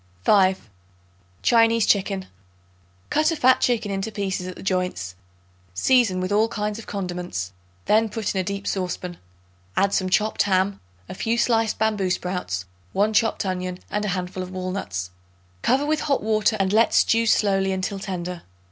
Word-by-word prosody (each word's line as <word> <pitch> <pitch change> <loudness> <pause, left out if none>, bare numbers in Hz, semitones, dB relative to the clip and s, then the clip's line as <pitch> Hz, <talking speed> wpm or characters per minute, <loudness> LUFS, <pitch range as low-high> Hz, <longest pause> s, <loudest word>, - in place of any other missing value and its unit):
5. 190 - +3 0.8
Chinese 230 -1 +4
Chicken. 195 -1 +1 0.9
Cut 310 +1 +3
a 330 - 0
fat 260 -3 +4
chicken 230 -4 +1
into 195 +3 -3
pieces 195 -3 -3
at 185 - -6
the - - -10
joints; 180 - -1 0.6
season 235 - +3
with 185 +1 -2
all 215 +2 +3
kinds 210 -1 -3
of 230 - -11
condiments; 175 - -4 0.3
then 220 +1 +3
put 220 -1 -2
in 190 - 0
a - - -3
deep 200 +2 -4
saucepan. 180 -2 -3 0.6
Add 200 +1 +3
some 185 -1 +1
chopped 210 +3 +2
ham, 195 0 +1 0.3
a - - -7
few 230 +5 -1
sliced 225 -2 +2
bamboo 210 -3 +1
sprouts, 180 - -2 0.3
1 210 +2 +2
chopped 225 -1 +2
onion 185 -1 -3
and 210 0 -1
a - - -1
handful 185 +1 -4
of 185 - -5
walnuts. 185 - -4 0.5
Cover 265 +4 +2
with 305 +1 +1
hot 280 -6 0
water 215 0 +2
and 195 0 +1
let 225 +1 +4
stew 230 0 +4
slowly 195 -3 +2
until 190 +1 -2
tender. 180 -3 -5
195 Hz, 165 wpm, -23 LUFS, 185-220 Hz, 0.9 s, Chinese